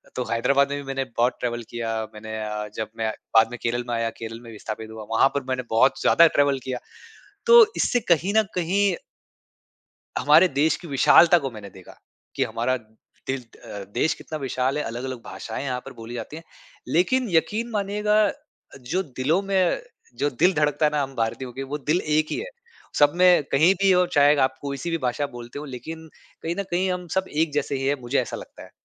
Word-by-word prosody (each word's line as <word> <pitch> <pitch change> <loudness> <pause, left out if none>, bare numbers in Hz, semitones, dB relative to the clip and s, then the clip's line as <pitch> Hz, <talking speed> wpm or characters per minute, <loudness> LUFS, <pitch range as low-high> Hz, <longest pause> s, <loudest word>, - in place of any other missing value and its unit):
तो 125 - -1
हैदराबाद 140 +5 +2
में 145 - -2
भी 145 - -6
मैंने 135 0 -1
बहुत 120 +2 +2
ट्रैवल 120 -1 -3
किया 115 -1 -3 0.2
मैंने 110 0 -7
अ, 105 0 -4
जब 110 -1 -4
मैं 110 -1 -1 0.2
बाद 110 - +6
में 120 - -6
केरल 120 +1 -1
में 120 - -2
आया 115 0 0
केरल 115 0 -6
में 115 -1 -11
विस्थापित 110 0 -7
हुआ। 110 -1 -8
वहाँ 135 - +5
पर 140 - -1
मैंने 130 0 -1
बहुत 130 +4 +3
ज़्यादा 170 - +6
ट्रैवल 140 -3 +2
किया। 130 -1 -4 0.7
तो 475 -1 +9
इससे 245 - +2
कहीं 175 +5 +3
न 220 - +6
कहीं 185 +2 +1 1.2
हमारे 155 +5 +6
देश 150 +2 +1
की 175 - -11
विशालता 165 +5 +6
को 135 -3 -4
मैंने 105 -3 -10
देखा। 95 -1 -15 0.4
कि - - +1
हमारा 120 +3 -1
दिल 115 +3 -8
अ, 105 -3 -10
देश 160 - +1
कितना 155 - -7
विशाल 130 0 -1
है 150 - -1
अलग-अलग 125 +1 -5
भाषाएँ 95 +6 -6
यहाँ 125 -2 -2
पर - - -9
बोली 115 +1 -9
जाती 120 +5 -6
हैं। 165 - -10 0.4
लेकिन 245 +8 +1
यकीन 210 +7 +1
मानिएगा 210 0 +1
अ, - - -2 0.4
जो 140 +9 -2
दिलों 145 +5 0
में 195 - +1 0.4
जो 145 - +1
दिल 175 +8 +2
धड़कता 150 0 +1
है 150 - +2
ना 150 -1 0
हम 135 0 -7
भारतीयों 115 +2 -2
के 135 - -5
वो 140 +2 -4
दिल 150 +5 0
एक 155 0 +1
ही - - -1
है। 475 - -5 0.5
सब 145 0 +5
में 180 -3 +5
कहीं 160 +7 +5
भी 195 -1 +5
और 180 0 +3
चाहे 145 0 +5
आप 130 0 -5
कोई 140 -1 -4
सी 170 - -4
भी 165 - +1
भाषा 145 +4 -1
बोलते 120 +4 -8
हो 150 - -7
लेकिन 160 +5 -8 0.3
कहीं 165 +1 -3
न - - 0
कहीं 185 +2 +1
हम 180 -1 -4
सब 190 0 0
एक 155 +1 0
जैसे 145 -1 -1
ही 135 - -3
हैं 145 - +2
मुझे 120 +3 0
ऐसा - - -5
लगता - - -11
है। - - -15
140 Hz, 210 wpm, -24 LUFS, 120-170 Hz, 1.2 s, तो